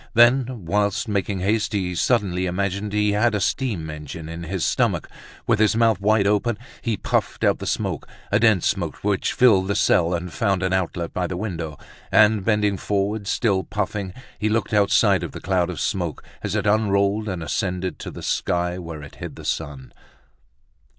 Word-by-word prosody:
Then, 120 -2 +4
whilst 105 +4 0
making 100 -2 -1
haste, 105 +2 0
he 95 -3 -1
suddenly 95 -2 +1
imagined 100 +3 -2
he 105 0 +2
had 105 +2 +2
a - - +1
steam 100 -5 -1
engine 75 +1 -8
in 85 +1 -6
his 90 +1 -2
stomach; - - +1 0.4
with 115 -3 +2
his 110 0 +4
mouth 115 -4 +3
wide 105 0 +3
open, 105 +2 +1 0.2
he 115 -4 -1
puffed - - -1
out - - +3
the - - -5
smoke, - - -2 0.2
a 105 - +4
dense 110 -6 +4
smoke - - -1
which 100 -1 +1
filled 100 -7 +4
the 100 - 0
cell 85 +1 +3
and 90 0 -5
found 95 -1 0
an 95 0 0
outlet 85 -2 -2
by 90 -1 -1
the 90 - -4
window; 85 -7 -4 0.3
and, 105 -1 +5
bending 105 -2 +2
forward, 100 +1 -1
still 100 -4 +1
puffing, 105 -2 -3 0.3
he 110 - +1
looked 115 +1 0
outside 105 -1 +4
of - - -5
the - - -6
cloud 90 -2 0
of 85 -5 -5
smoke 85 -5 -2 0.2
as - - -3
it - - 0
unrolled 105 0 +2
and 90 -4 -4
ascended 90 +1 -2
to - - -6
the - - -9
sky, 90 +1 -1
where 80 -4 -7
it 70 - -12
hid - - -7
the - - -11
sun. 70 -5 -4
100 Hz, 185 wpm, -23 LUFS, 90-105 Hz, 0.4 s, and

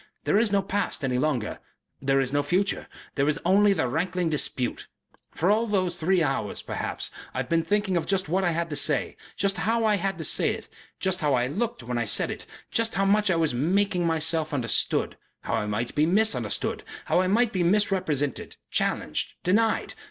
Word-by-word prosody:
There 205 - +3
is 225 -2 +1
no 200 -1 +2
past 200 -5 -2
any 125 -2 0
longer, 130 -6 -1 0.4
there 135 0 +2
is 135 0 -1
no 145 - +3
future, 190 +6 0 0.3
there 140 0 +1
is 150 +1 +1
only 200 +3 +5
the 160 -9 +1
rankling 170 +5 -1
dispute. 130 -4 -2 0.4
For 180 +5 +1
all 225 +2 +2
those 185 -4 0
three 175 +1 +2
hours, 135 -8 -2
perhaps, - - -3 0.2
I - - -3
have - - -2
been 165 0 +3
thinking 205 +2 0
of 170 - 0
just 190 -3 0
what 185 +5 +1
I 175 - +2
had 170 0 -1
to - - -2
say, 145 -2 0 0.2
just 195 0 0
how 230 +1 +1
I 210 -1 +3
had 195 +1 -2
to - - -5
say - - +2
it, - - -10 0.3
just 190 -1 0
how 145 -3 +2
I 120 -1 +1
looked 185 - -3
while 120 0 -2
I 120 - 0
said 105 - 0
it, - - -8 0.2
just 230 0 +1
how 195 - +2
much 205 +1 +3
I 180 - +3
was 160 -4 +1
making 180 +6 +1
myself 160 -1 0
understood, 120 -4 0 0.2
how - - -4
I 105 - 0
might 110 +3 -2
be 150 +1 +2
misunderstood, 220 +5 +1 0.2
how 180 - +3
I 185 - +1
might 225 +4 +2
be 185 - 0
misrepresented, 175 -7 0
challenged, - - -1
denied. 220 +5 +1
175 Hz, 205 wpm, -26 LUFS, 145-200 Hz, 0.4 s, only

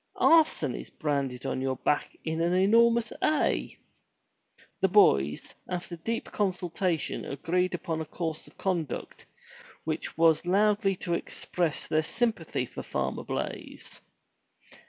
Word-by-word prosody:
Arson 310 - +4
is - - -7
branded 140 -4 -2
on 130 - -2
your 130 0 0
back 145 - -1
in 160 0 -1
an 170 +1 +2
enormous 230 +4 +4
A." 305 -1 +1 1.0
The 190 - +4
boys, 75 - +3 0.2
after 180 -1 -4
deep 225 +8 -3
consultation 180 -4 -1
agreed 180 +6 -1
upon 165 -2 -3
a - - -4
course 160 0 -4
of - - -19
conduct 175 -6 -3 0.6
which - - -4
was 165 -1 +4
loudly 200 +1 +3
to 175 -1 -3
express 170 -1 -2
their 155 - +2
sympathy 230 +8 -1
for - - -8
Farmer - - -3
Blaize. - - -6
175 Hz, 125 wpm, -28 LUFS, 155-200 Hz, 1.0 s, Arson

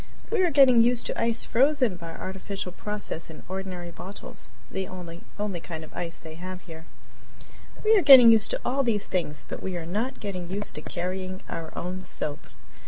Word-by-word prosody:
We 445 -4 +3
are 360 - +4
getting 270 -5 +7
used 240 0 +2
to - - -3
ice 230 0 +2
frozen 255 -4 +3
by 165 -2 -8
artificial 190 0 -5
process 205 -4 -5
in 160 - -11
ordinary 185 -2 -5
bottles 190 +4 -9 0.2
the 190 -1 -2
only 175 -2 -8 0.4
kind 160 -1 -7
of 155 - -13
ice 165 -2 -5
they 160 -1 -10
have 185 +2 -7
here. 160 -1 -11 1.0
We 440 +1 +6
are 405 - +5
getting 260 -6 +10
used 220 -1 +4
to - - -2
all 270 +3 +1
these 225 -6 +1
things, 150 -5 -3
but - - -6
we 185 -2 -3
are 165 - -5
not 215 +9 -2
getting 185 -4 -5
used 205 +2 -4
to - - -5
carrying 185 +1 -4
our 165 -1 -5
own 180 +2 -4
soap. 155 -5 -3
185 Hz, 185 wpm, -26 LUFS, 175-230 Hz, 1.0 s, getting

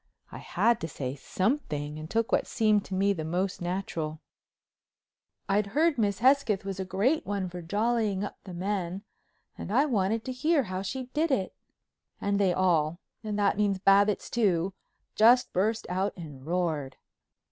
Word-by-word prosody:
I - - -8
had 235 -1 +1
to 165 - -2
say 135 -4 -4
something 150 - -2
and 155 +1 -8
took 230 +2 0
what - - +2
seemed 215 -3 +2
to 190 - -5
me 200 +1 +3
the 160 -5 -4
most 180 +4 -2
natural. 170 -4 -3 1.3
"I'd 200 +1 +1
heard 320 -4 +3
Miss 200 -3 +1
Hesketh 245 -5 +3
was 195 -1 -4
a 190 - -2
great 205 +12 +1
one 195 -1 -2
for 180 0 -7
jollying 210 +2 0
up 205 - -6
the 185 - -9
men 190 0 -3 0.6
and - - -5
I 265 +7 +4
wanted 220 -4 0
to 260 - -3
hear 295 +3 +2
how 185 -3 -4
she 255 +7 -4
did 320 +2 +1
it." 200 -9 0 0.7
And 200 0 0
they 195 -2 +3
all—that 185 +5 0
means 205 -2 +2
Babbitts, 200 +2 +3
too—just 215 +4 +2
burst 215 +5 0
out 190 +3 -1
and 145 -5 -10
roared. 165 -6 -1
195 Hz, 160 wpm, -28 LUFS, 180-220 Hz, 1.3 s, I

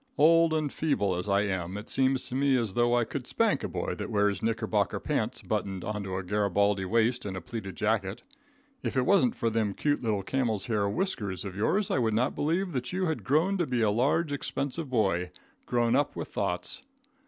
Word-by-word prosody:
Old 165 +1 +5
and 155 -3 0
feeble 105 -12 +1
as 90 +3 -3
I 100 0 +3
am, 95 -2 -2
it 105 +3 -8
seems 130 -1 +1
to - - -7
me 135 0 +3
as 115 -6 -1
though 120 +2 +3
I 120 - +3
could - - -5
spank - - +1
a - - -1
boy - - -3
that - - -5
wears 100 -2 +1
knickerbocker 115 0 0
pants - - -2
buttoned 95 -2 -2
onto 100 -3 -3
a 95 - -2
Garabaldy 100 0 +1
waist 115 +4 +2
and 95 -2 -4
a - - -2
pleated 95 -1 -6
jacket. 105 0 -1 0.6
If - - -3
it 125 - +3
wasn't 215 - +4
for 115 - 0
them 110 -3 0
cute 145 -1 0
little 105 -5 0
camel's 115 -3 0
hair 105 -3 0
whiskers 105 - -2
of 95 -2 -6
yours 190 - +1
I - - +2
would 110 -3 +1
not 125 +5 +1
believe 175 +5 0
that 125 -4 -3
you 185 +1 0
had 160 -2 -2
grown 170 +8 +2
to 170 - +1
be 125 -2 +1
a 105 - +3
large, 145 +8 +1
expensive 140 +1 -2
boy, 95 -7 +1 0.4
grown 120 -1 +2
up 145 +1 +1
with - - -5
thoughts. 90 -3 -2
115 Hz, 210 wpm, -28 LUFS, 100-140 Hz, 0.6 s, Old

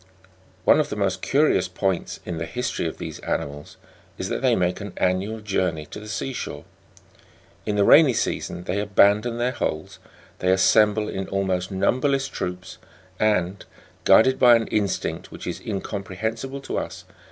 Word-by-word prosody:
6. 95 - -29 0.6
One - - +6
of 150 - 0
the - - -4
most 100 -3 -1
curious 135 -10 +2
points 95 0 -2
in 85 -2 -4
the 85 - -4
history 125 -7 -2
of 80 - -6
these - - -7
ani - - -1
mals 75 +1 -10 0.4
is - - -4
that - - -2
they - - +3
make 90 +2 0
an 100 -2 -7
annual 95 +4 0
journey 90 -6 -1
to - - -7
the 105 - -10
sea 130 +5 -3
shore. 75 -9 -6 1.0
In 105 - 0
the 100 - +3
rainy 145 +5 +7
season 90 - -2
they 90 +3 -2
abandon 105 +3 +3
their 120 +1 0
holes; 80 -10 -4 0.4
they 90 - +2
assemble 105 +3 +4
in 95 -2 -4
almost 95 -2 -1
numberless 135 +8 +1
troops, 90 -5 -6 0.4
and, 100 -3 +1 0.4
guided 130 +4 +5
by 120 -1 +8
an 115 -1 +1
instinct 100 -3 -2
which - - -9
is - - -5
incomprehensible 110 +6 -4
to - - -3
us. - - -7
100 Hz, 170 wpm, -24 LUFS, 90-115 Hz, 1.0 s, by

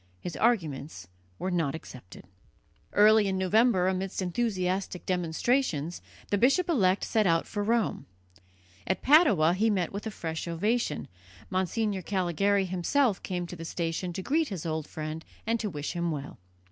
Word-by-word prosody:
His 175 - -6
arguments 155 - -1 0.3
were 185 - -3
not 165 -5 0
accepted. 125 - -11 0.7
Early 210 0 +5
in 190 -1 0
November, 190 0 +3
amidst 190 0 -2
enthusiastic 185 -2 -1
demonstrations, 175 - 0 0.3
the 205 - +2
bishop 275 - +3
elect 195 - +3
set 215 -3 +2
out 165 -1 +2
for 205 -2 -3
Rome. 230 +1 0 0.8
At 190 - -1
Padua 220 - +5
he 215 +5 +2
met 190 -4 0
with 205 +3 -4
a - - -1
fresh 165 -5 -5
ovation, 205 +1 -1 0.4
Monsignor 190 +2 0
Callegari 195 +2 +1
himself 190 +6 +1
came 180 -1 -3
to 175 - -8
the 165 - -8
station 165 +2 -3
to 190 - -5
greet 315 - +1
his 185 -6 -6
old 160 -2 -2
friend 155 +1 -5 0.2
and 230 +1 0
to 215 - -2
wish 150 -4 -4
him 170 -1 -1
well. 145 - -5
185 Hz, 155 wpm, -28 LUFS, 165-215 Hz, 0.8 s, Early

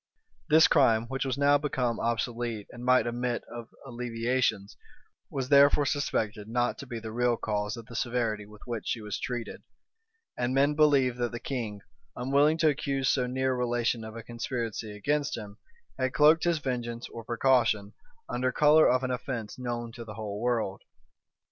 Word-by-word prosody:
This 160 +2 +7
crime, 115 -6 +4
which 135 0 -2
was 130 0 -2
now 145 0 +4
become 125 -5 -1
obsolete, 115 -2 -2
and 120 0 -10
might 125 +1 +4
admit 120 0 -2
of 120 -1 -9 0.2
alleviations, 120 -4 -1 0.5
was 130 -2 -3
therefore 140 0 +6
suspected 110 -7 -1
not 120 +2 0
to 140 - -8
be 120 - -5
the 110 0 -7
real 120 +1 +1
cause 105 +1 -2
of 115 - -9
the 120 -1 -11
severity 115 -4 -1
with 105 0 -15
which 115 -3 -5
she 120 - -1
was 105 -1 -5
treated; 120 -2 -5 0.7
and 125 +2 -1
men 140 +2 +4
believed 140 -5 +3
that 120 -1 -1
the 120 - -5
king, 115 -7 -4 0.3
unwilling 140 +5 +3
to 160 -1 +4
accuse 135 -2 -1
so 125 -2 +1
near 130 +1 0
a - - -2
relation 120 -2 0
of 110 0 -8
a 115 - -7
conspiracy 115 -2 -4
against 145 +6 -1
him, 105 -2 -9 0.4
had 130 0 -1
cloaked 155 +3 +5
his 170 -1 +2
vengeance 120 -4 -4
or 115 - -8
precaution 115 -4 +2 0.3
under 130 +1 -1
color 150 +3 +5
of 130 +1 +2
an 130 - -1
offence 125 -2 -4
known 120 -2 -4
to 115 0 -9
the 110 -2 -9
whole 105 -1 -5
world. 115 -5 -1
120 Hz, 175 wpm, -28 LUFS, 115-135 Hz, 0.7 s, This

